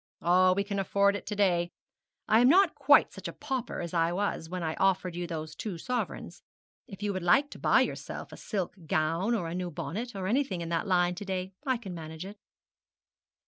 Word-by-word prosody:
'Oh, 185 +1 +4
we 200 +2 0
can 200 0 -3
afford 200 +1 +2
it - - -7
to 210 - -3
day. 175 -4 +2 0.6
I 220 - +5
am 245 +2 +6
not 370 +2 +5
quite 285 0 +5
such - - -7
a - - -4
pauper 265 -4 -4
as 170 0 -5
I 165 0 +2
was 180 -3 -2
when 180 0 -4
I 160 -1 -1
offered 185 -2 +1
you 175 0 -3
those 155 -2 -5
two 195 +1 -5
sovereigns. 250 +8 -4 0.5
If 195 0 -9
you 205 -1 0
would 185 - -3
like 180 +12 +3
to - - -10
buy - - +4
yourself - - -4
a - - -8
silk 195 -5 -3
gown 165 +9 +1
or 180 -7 -2
a 165 - -4
new 180 0 -3
bonnet, 220 +8 -5
or 190 -1 -4
anything 215 -4 0
in 165 - -4
that 170 +4 -1
line 175 -1 +3
to 190 +3 -7
day, 190 0 -3
I 260 -1 +2
can 200 -6 -8
manage 160 0 -7
it.' 200 +1 -10
185 Hz, 220 wpm, -29 LUFS, 175-210 Hz, 0.6 s, am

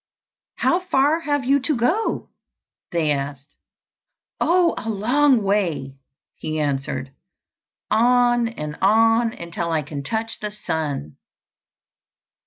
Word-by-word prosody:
"How 345 - +2
far 310 -3 +2
have 290 -4 -1
you 275 +2 +4
to 290 +3 -1
go?" 335 - 0 0.6
they 165 -4 +1
asked. 140 0 -4 0.9
"Oh, 345 0 +3
a 225 - -5
long 245 +4 +3
way!" 180 -9 0 0.4
he 155 0 -3
answered. 135 -2 -2 0.8
"On 240 +1 +4
and 150 -9 -6
on 225 +3 +4
until 170 -4 -5
I 155 -2 0
can 145 0 -6
touch 225 +9 -3
the 210 - -3
sun." 155 - -4
215 Hz, 110 wpm, -22 LUFS, 155-250 Hz, 0.9 s, you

